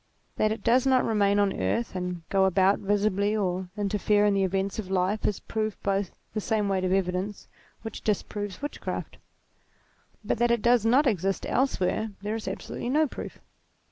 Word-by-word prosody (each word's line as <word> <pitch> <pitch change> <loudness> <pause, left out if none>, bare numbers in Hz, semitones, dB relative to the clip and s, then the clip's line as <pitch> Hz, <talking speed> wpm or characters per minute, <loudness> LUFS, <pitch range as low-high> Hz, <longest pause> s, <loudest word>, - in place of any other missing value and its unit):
That 215 - +2
it 220 - -4
does 250 +3 +3
not 260 -1 +4
remain 205 -2 +2
on 200 -1 +2
earth 230 -4 -1
and 180 -2 -4
go 195 -1 +3
about 190 +1 +3
visibly 205 +1 +1
or 185 -2 -1
interfere 205 0 +2
in 205 - +3
the 195 -1 +2
events 195 +2 -1
of 195 -4 -5
life, 190 +3 0
is 205 - -1
proved 215 -1 -3
by 195 0 +1 0.3
the 215 - -2
same 215 -1 0
weight 190 -1 0
of 185 - 0
evidence 190 +1 -1 0.4
which 225 -2 -6
dis 210 -3 0
proves 205 +4 -6
witchcraft. 290 - -5 1.1
But - - -1
that 240 0 +3
it 235 -2 +1
does 240 -2 +4
not 265 +6 +5
exist 195 -5 0
else 265 -2 +1
where, 215 +4 0
there 210 +1 -2
is 225 -2 -5
absolutely 195 +5 -4
no 305 +4 +3
proof. - - -8
205 Hz, 185 wpm, -27 LUFS, 190-220 Hz, 1.1 s, not